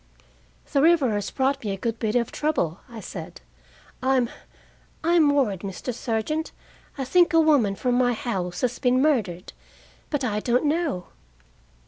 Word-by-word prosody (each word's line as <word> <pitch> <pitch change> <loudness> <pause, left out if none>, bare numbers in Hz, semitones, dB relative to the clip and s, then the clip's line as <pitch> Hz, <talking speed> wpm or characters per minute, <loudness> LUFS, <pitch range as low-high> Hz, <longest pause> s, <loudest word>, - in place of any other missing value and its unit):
"The 280 - +3
river 315 -6 +4
has 205 -1 -2
brought 275 0 0
me 210 - -3
a 195 - -2
good 230 +3 -3
bit 220 -1 -1
of 235 -2 +1
trouble," 200 - -1
I 230 -2 -9
said. - - -8 0.6
"I'm 255 -2 +2 0.7
I'm 330 -2 +4
worried, 260 -10 +1
Mr. 195 +6 -5
Sergeant. 240 +7 -2 0.5
I 270 - -2
think 345 +6 +4
a 330 - +6
woman 285 -11 +3
from 250 +4 -1
my 245 -1 +3
house 190 -7 -3
has 250 - -1
been 255 -1 +2
murdered, 220 - 0 0.6
but 290 -3 -1
I 210 -4 0
don't 245 +5 +1
know." 295 - 0
250 Hz, 155 wpm, -24 LUFS, 215-290 Hz, 0.7 s, a